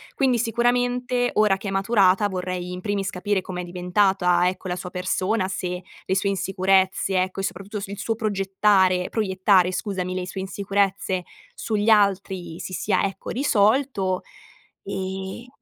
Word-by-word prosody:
Quindi 260 Hz, -3 st, +2 dB
sicuramente, 245 Hz, +2 st, +1 dB
ora 210 Hz, -2 st, +4 dB
che 200 Hz, -, -7 dB
è -, -, -2 dB
maturata, 195 Hz, 0 st, +3 dB
vorrei 180 Hz, -1 st, -4 dB
in 180 Hz, 0 st, -6 dB
primis 200 Hz, -1 st, -1 dB
capire 190 Hz, +1 st, -1 dB
com'è 180 Hz, -1 st, -5 dB
diventata, 180 Hz, 0 st, +2 dB
ecco, 185 Hz, 0 st, -7 dB
la 180 Hz, -, -2 dB
sua 180 Hz, 0 st, -6 dB
persona, 185 Hz, +2 st, -1 dB
se 180 Hz, -1 st, -4 dB, 0.2 s
le 190 Hz, -, 0 dB
sue 195 Hz, +1 st, +1 dB
insicurezze, 190 Hz, 0 st, +1 dB
ecco, 185 Hz, +1 st, -3 dB
e -, -, -5 dB
soprattutto 195 Hz, +3 st, -4 dB
s 195 Hz, -, -6 dB
il 200 Hz, 0 st, -7 dB
suo 225 Hz, -, -1 dB
progettare 195 Hz, -3 st, +2 dB
proiettare, 190 Hz, -3 st, +2 dB
scusami, 185 Hz, -2 st, -3 dB
le 185 Hz, -1 st, -2 dB
sue 190 Hz, +1 st, -5 dB
insicurezze 195 Hz, -1 st, -1 dB, 0.3 s
sugli 215 Hz, -1 st, -1 dB
altri 195 Hz, -5 st, +2 dB
si 185 Hz, -, -6 dB
sia, 190 Hz, 0 st, 0 dB
ecco, 195 Hz, -1 st, -4 dB
risolto. 220 Hz, -5 st, +1 dB, 0.7 s
E 190 Hz, +4 st, -5 dB
195 Hz, 150 wpm, -23 LUFS, 185-210 Hz, 0.7 s, ora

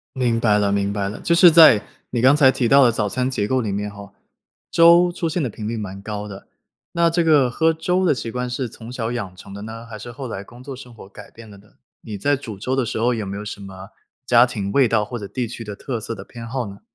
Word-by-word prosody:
明 120 Hz, -3 st, 0 dB
白 105 Hz, -3 st, +3 dB
了， 100 Hz, -1 st, +1 dB
明 100 Hz, 0 st, 0 dB
白 100 Hz, -1 st, -2 dB
了， 105 Hz, -, -7 dB
就 170 Hz, -, +1 dB
是 175 Hz, +1 st, +8 dB
在 155 Hz, -11 st, +7 dB, 0.3 s
你 120 Hz, -, -1 dB
刚 130 Hz, +4 st, +6 dB
才 145 Hz, -3 st, +6 dB
提 130 Hz, -2 st, -1 dB
到 140 Hz, +2 st, +6 dB
的 120 Hz, -, +5 dB
早 105 Hz, -2 st, -1 dB
餐 125 Hz, +4 st, -1 dB
结 105 Hz, -6 st, -1 dB
构 130 Hz, +3 st, 0 dB
里 110 Hz, -4 st, -3 dB
面 100 Hz, +1 st, -3 dB
哈， 100 Hz, -1 st, -12 dB, 0.6 s
粥 170 Hz, +1 st, +6 dB
出 170 Hz, -1 st, -3 dB
现 160 Hz, +3 st, -2 dB
的 135 Hz, -, -1 dB
频 105 Hz, -1 st, -7 dB
率 115 Hz, -, -3 dB
蛮 100 Hz, -2 st, -7 dB
高 105 Hz, 0 st, -5 dB
的， 100 Hz, -1 st, -11 dB, 0.4 s
那 170 Hz, 0 st, +3 dB
这 170 Hz, +1 st, +1 dB
个 150 Hz, -5 st, +4 dB
喝 160 Hz, +6 st, +2 dB
粥 180 Hz, +3 st, -1 dB
的 175 Hz, -, +4 dB
习 120 Hz, -4 st, -4 dB
惯 125 Hz, 0 st, -3 dB
是 125 Hz, 0 st, -3 dB
从 115 Hz, +1 st, -11 dB
小 115 Hz, -2 st, -3 dB
养 100 Hz, -7 st, -5 dB
成 100 Hz, +1 st, -12 dB
的 100 Hz, -, -8 dB
呢？ 115 Hz, +2 st, -8 dB
还 115 Hz, -2 st, -9 dB
是 115 Hz, +3 st, -9 dB
后 130 Hz, +3 st, -7 dB
来 100 Hz, -5 st, -6 dB
工 120 Hz, +5 st, -15 dB
作 135 Hz, +1 st, -8 dB
生 125 Hz, -1 st, -12 dB
活 110 Hz, -4 st, -13 dB
改 100 Hz, -, -13 dB
变 115 Hz, -1 st, -14 dB
了 100 Hz, -1 st, -14 dB
呢？ 105 Hz, +2 st, -21 dB, 0.3 s
你 105 Hz, -2 st, -8 dB
在 145 Hz, +9 st, +1 dB
煮 110 Hz, -7 st, -9 dB
粥 125 Hz, +6 st, -2 dB
的 130 Hz, -1 st, +1 dB
时 115 Hz, -, -4 dB
候 120 Hz, +2 st, +1 dB
有 110 Hz, -2 st, -3 dB
没 100 Hz, 0 st, -6 dB
有 105 Hz, -, -6 dB
什 105 Hz, -, -7 dB
么 95 Hz, 0 st, -10 dB, 0.4 s
家 120 Hz, -1 st, +6 dB
庭 100 Hz, -5 st, -4 dB
味 135 Hz, 0 st, +4 dB
道 110 Hz, -2 st, +1 dB
或 120 Hz, -, -7 dB
者 100 Hz, -2 st, -8 dB
地 125 Hz, +2 st, -3 dB
区 115 Hz, +1 st, -8 dB
的 105 Hz, -2 st, -7 dB
特 120 Hz, +2 st, -5 dB
色 110 Hz, -, -5 dB
的 -, -, -10 dB
偏 115 Hz, -1 st, -10 dB
好 125 Hz, 0 st, -3 dB
呢？ 100 Hz, 0 st, -11 dB
115 Hz, 300 characters per minute, -21 LUFS, 105-130 Hz, 0.6 s, 是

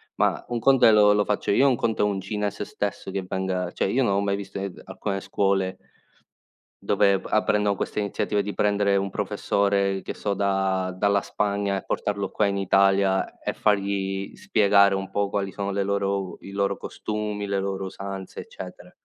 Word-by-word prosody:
ma -, -, +1 dB
un 120 Hz, -, -2 dB
conto 135 Hz, +2 st, +5 dB
è -, -, +7 dB
lo 105 Hz, -1 st, +6 dB
lo 105 Hz, 0 st, +3 dB
faccio 105 Hz, 0 st, -1 dB
io, 135 Hz, +7 st, +5 dB
un 130 Hz, -, +3 dB
conto 115 Hz, -1 st, -1 dB
è -, -, +4 dB
un 100 Hz, -2 st, -1 dB
cinese 105 Hz, +1 st, -3 dB
stesso 100 Hz, -1 st, -4 dB
che 95 Hz, 0 st, -2 dB
venga 95 Hz, -1 st, -2 dB
cioè, -, -, -1 dB
io 135 Hz, -, +2 dB
non 115 Hz, -6 st, +2 dB
ho 100 Hz, -, +2 dB
mai 100 Hz, -1 st, 0 dB
visto 100 Hz, 0 st, -7 dB
in 95 Hz, -, -3 dB
ed 95 Hz, -, -8 dB
alcune 95 Hz, -1 st, -4 dB
scuole 95 Hz, -2 st, 0 dB, 1.1 s
dove 100 Hz, -2 st, +3 dB
p -, -, -11 dB
apprendono 105 Hz, -1 st, +2 dB
queste -, -, -3 dB
iniziative 100 Hz, 0 st, -1 dB
di 100 Hz, +1 st, -5 dB
prendere 100 Hz, -1 st, +2 dB
un 100 Hz, 0 st, 0 dB
professore, 100 Hz, 0 st, 0 dB
che -, -, -6 dB
so, 100 Hz, -, -2 dB
da 95 Hz, -1 st, 0 dB
dalla 100 Hz, +1 st, +2 dB
Spagna 100 Hz, 0 st, -1 dB
e 95 Hz, -, -5 dB
portarlo 100 Hz, -2 st, -2 dB
qua 105 Hz, -, +1 dB
in 100 Hz, 0 st, 0 dB
Italia 95 Hz, 0 st, +2 dB
e -, -, -2 dB
fargli 100 Hz, -1 st, -1 dB
spiegare 100 Hz, -2 st, +4 dB
un 95 Hz, 0 st, -3 dB
po' 100 Hz, -1 st, 0 dB
quali 100 Hz, -1 st, -2 dB
sono 100 Hz, 0 st, -3 dB
le 100 Hz, 0 st, 0 dB
loro 100 Hz, 0 st, 0 dB
u 95 Hz, -1 st, -7 dB
i 100 Hz, -, -10 dB
loro 100 Hz, 0 st, 0 dB
costumi, 105 Hz, -1 st, -4 dB
le 100 Hz, 0 st, -1 dB
loro 95 Hz, 0 st, -3 dB
usanze, 95 Hz, 0 st, -7 dB
eccetera. -, -, -10 dB
100 Hz, 195 wpm, -25 LUFS, 95-105 Hz, 1.1 s, è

